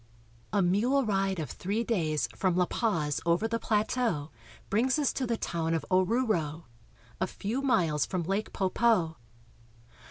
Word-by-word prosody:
A 200 0 +2
mule 240 +10 +2
ride 195 -2 0
of 155 - -4
three 205 +5 -2
days 155 - 0
from 185 +7 +1
La 180 0 +3
Paz 165 -10 -1
over 170 +6 +2
the 230 0 -1
plateau 210 - 0 0.4
brings 255 +7 +2
us 290 -3 +1
to 260 - -2
the 230 -1 0
town 165 -4 -1
of 165 - -2
Oruro 185 - +5
(o 250 +2 +2 0.2
roo'ro), 155 +3 -9 0.6
a 185 - +1
few 220 +8 -3
miles 165 - +2
from 185 -3 -2
Lake 195 +5 -2
Poopo. 190 -4 +1
195 Hz, 160 wpm, -29 LUFS, 170-230 Hz, 0.6 s, Oruro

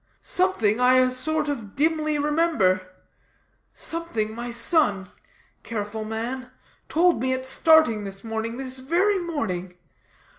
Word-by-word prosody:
Something 245 - +1
I 250 +1 +5
a 255 0 +4
sort 305 +4 -1
of 230 -9 -5
dimly 310 0 +1
remember. 295 - +2 0.9
Something, 275 -11 -3
my 240 +2 -5
son 235 - +2 0.6
careful 215 -1 -5
man 240 +4 -4 0.4
told 340 -4 +3
me 260 0 +1
at 260 0 -4
starting 265 -6 +4
this 195 0 -8
morning, 225 +1 -4
this 260 0 -5
very 360 +9 +1
morning. 185 - -4
255 Hz, 120 wpm, -24 LUFS, 220-315 Hz, 0.9 s, I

